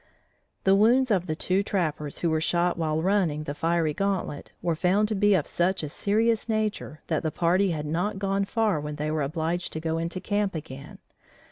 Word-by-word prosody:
The 195 Hz, 0 st, +5 dB
wounds 240 Hz, +5 st, +4 dB
of 185 Hz, -3 st, +1 dB
the 155 Hz, -, -1 dB
two 185 Hz, +4 st, +1 dB
trappers 155 Hz, -7 st, -2 dB
who 170 Hz, -, +1 dB
were 160 Hz, 0 st, +1 dB
shot 175 Hz, +2 st, +1 dB
while 160 Hz, -1 st, -1 dB
running 180 Hz, -6 st, +1 dB
the 145 Hz, -, -4 dB
fiery 165 Hz, 0 st, 0 dB
gauntlet, 190 Hz, -5 st, -2 dB
were 170 Hz, -, 0 dB
found 190 Hz, +6 st, +2 dB
to -, -, 0 dB
be 205 Hz, 0 st, +4 dB
of 155 Hz, -5 st, +1 dB
such 180 Hz, 0 st, 0 dB
a 150 Hz, -, -3 dB
serious 220 Hz, +7 st, +1 dB
nature 215 Hz, -7 st, -2 dB
that 160 Hz, -3 st, -1 dB
the 160 Hz, -, -1 dB
party 180 Hz, +5 st, +2 dB
had 155 Hz, -3 st, -2 dB
not 180 Hz, +7 st, -1 dB
gone 195 Hz, 0 st, 0 dB
far 215 Hz, -5 st, +1 dB
when 150 Hz, 0 st, -5 dB
they 150 Hz, +1 st, -2 dB
were 155 Hz, -1 st, 0 dB
obliged 160 Hz, +4 st, -2 dB
to 160 Hz, -, -3 dB
go 160 Hz, 0 st, -1 dB
into 170 Hz, +2 st, -3 dB
camp 205 Hz, -1 st, -1 dB
again. 140 Hz, -3 st, -8 dB
175 Hz, 205 wpm, -26 LUFS, 155-200 Hz, -, The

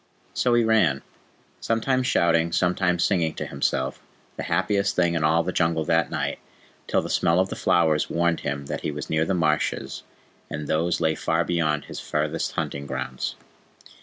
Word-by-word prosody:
So 125 Hz, -1 st, +2 dB
he 120 Hz, -, +4 dB
ran, 110 Hz, -12 st, +3 dB, 0.6 s
sometimes 125 Hz, +3 st, 0 dB
shouting, 85 Hz, -8 st, +2 dB
sometimes 90 Hz, -1 st, +1 dB
singing 85 Hz, -5 st, +1 dB
to -, -, -4 dB
himself, 65 Hz, -1 st, -2 dB, 0.3 s
the -, -, -5 dB
happiest 95 Hz, +3 st, +1 dB
thing 85 Hz, -1 st, +2 dB
in 80 Hz, -2 st, 0 dB
all 80 Hz, +2 st, +3 dB
the 90 Hz, -, -2 dB
Jungle 80 Hz, -2 st, +1 dB
that -, -, +2 dB
night, -, -, -2 dB, 0.5 s
till -, -, +1 dB
the -, -, -4 dB
smell 85 Hz, +2 st, +3 dB
of 95 Hz, +1 st, +1 dB
the -, -, -4 dB
flowers 80 Hz, -3 st, +2 dB
warned 85 Hz, 0 st, +1 dB
him 70 Hz, 0 st, -3 dB
that -, -, -4 dB
he -, -, -2 dB
was 75 Hz, -1 st, -5 dB
near 80 Hz, 0 st, +2 dB
the 95 Hz, -, 0 dB
marshes, 75 Hz, -3 st, 0 dB, 0.5 s
and 75 Hz, -1 st, -5 dB
those 85 Hz, +2 st, 0 dB
lay 80 Hz, -1 st, +2 dB
far 80 Hz, +2 st, 0 dB
beyond 80 Hz, -4 st, 0 dB
his -, -, -7 dB
farthest 75 Hz, +2 st, -2 dB
hunting 70 Hz, 0 st, -3 dB
grounds. 65 Hz, -1 st, -4 dB
85 Hz, 175 wpm, -24 LUFS, 75-90 Hz, 0.6 s, he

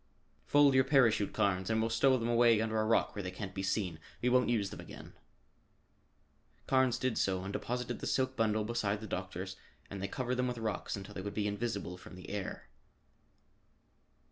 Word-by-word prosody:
"Fold 145 Hz, -1 st, +6 dB
your 130 Hz, 0 st, +5 dB
parachute, 125 Hz, -7 st, +3 dB
Carnes, 95 Hz, -1 st, 0 dB
and 110 Hz, 0 st, +2 dB
we'll 115 Hz, 0 st, 0 dB
stow 130 Hz, +3 st, +4 dB
them 115 Hz, -1 st, -2 dB
away 120 Hz, -1 st, +5 dB
under 110 Hz, 0 st, 0 dB
a -, -, 0 dB
rock 115 Hz, +1 st, +2 dB
where 100 Hz, -, -3 dB
they 90 Hz, -, -4 dB
can't 95 Hz, +1 st, -6 dB
be 95 Hz, -, -3 dB
seen. 95 Hz, -4 st, -1 dB, 0.2 s
We 125 Hz, -, +1 dB
won't 125 Hz, 0 st, +3 dB
use 105 Hz, -5 st, +1 dB
them -, -, -8 dB
again." -, -, -10 dB, 1.5 s
Carnes 130 Hz, -2 st, +3 dB
did 130 Hz, -3 st, -1 dB
so 95 Hz, -1 st, 0 dB
and 100 Hz, +1 st, -5 dB
deposited 125 Hz, 0 st, -3 dB
the -, -, -4 dB
silk 130 Hz, 0 st, 0 dB
bundle 110 Hz, -2 st, +1 dB
beside 105 Hz, -2 st, -1 dB
the -, -, -6 dB
doctor's, 95 Hz, -1 st, -5 dB, 0.3 s
and 100 Hz, -1 st, -5 dB
they 100 Hz, -, -1 dB
covered 125 Hz, +3 st, -2 dB
them 125 Hz, 0 st, +1 dB
with 125 Hz, -1 st, -3 dB
rocks 110 Hz, -2 st, -2 dB
until 100 Hz, 0 st, -8 dB
they 95 Hz, -, -5 dB
would 100 Hz, +1 st, -5 dB
be 105 Hz, -, 0 dB
invisible 100 Hz, -3 st, -3 dB
from 90 Hz, -, -12 dB
the 90 Hz, -, -9 dB
air. 100 Hz, -2 st, -5 dB
110 Hz, 195 wpm, -33 LUFS, 100-120 Hz, 1.5 s, Fold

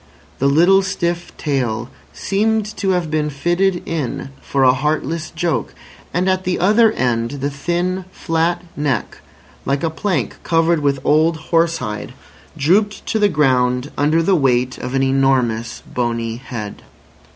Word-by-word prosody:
The 140 Hz, -, +2 dB
little 175 Hz, +7 st, +5 dB
stiff 175 Hz, -2 st, -2 dB
tail 120 Hz, -5 st, -2 dB, 0.2 s
seemed 220 Hz, +2 st, 0 dB
to 195 Hz, -, -1 dB
have 175 Hz, -4 st, 0 dB
been 155 Hz, -1 st, 0 dB
fitted 175 Hz, +6 st, 0 dB
in 145 Hz, -5 st, -3 dB
for 135 Hz, -1 st, 0 dB
a 125 Hz, -1 st, +6 dB
heartless 155 Hz, +3 st, -1 dB
joke; 170 Hz, -5 st, -2 dB, 0.4 s
and 180 Hz, +2 st, 0 dB
at 185 Hz, 0 st, +1 dB
the 185 Hz, 0 st, 0 dB
other 215 Hz, +4 st, +4 dB
end 115 Hz, -2 st, 0 dB
the 140 Hz, +2 st, -2 dB
thin, 175 Hz, +5 st, -2 dB
flat 165 Hz, +1 st, -1 dB
neck, 140 Hz, -6 st, -2 dB, 0.4 s
like 140 Hz, +3 st, -1 dB
a 165 Hz, -, 0 dB
plank 185 Hz, +3 st, -2 dB
covered 165 Hz, 0 st, +2 dB
with 140 Hz, -2 st, +1 dB
old 160 Hz, +3 st, +3 dB
horse 165 Hz, +1 st, +1 dB
hide, 105 Hz, -1 st, -5 dB, 0.4 s
drooped 205 Hz, +8 st, +2 dB
to 220 Hz, -, -1 dB
the 205 Hz, -1 st, +4 dB
ground 130 Hz, -4 st, +1 dB
under 155 Hz, +3 st, +2 dB
the 195 Hz, -, +3 dB
weight 130 Hz, -4 st, +1 dB
of 125 Hz, +2 st, -4 dB
an 135 Hz, -, +2 dB
enormous 130 Hz, -4 st, +1 dB
bony 115 Hz, -2 st, -1 dB
head. 115 Hz, -5 st, -7 dB
155 Hz, 150 wpm, -19 LUFS, 130-175 Hz, 0.4 s, a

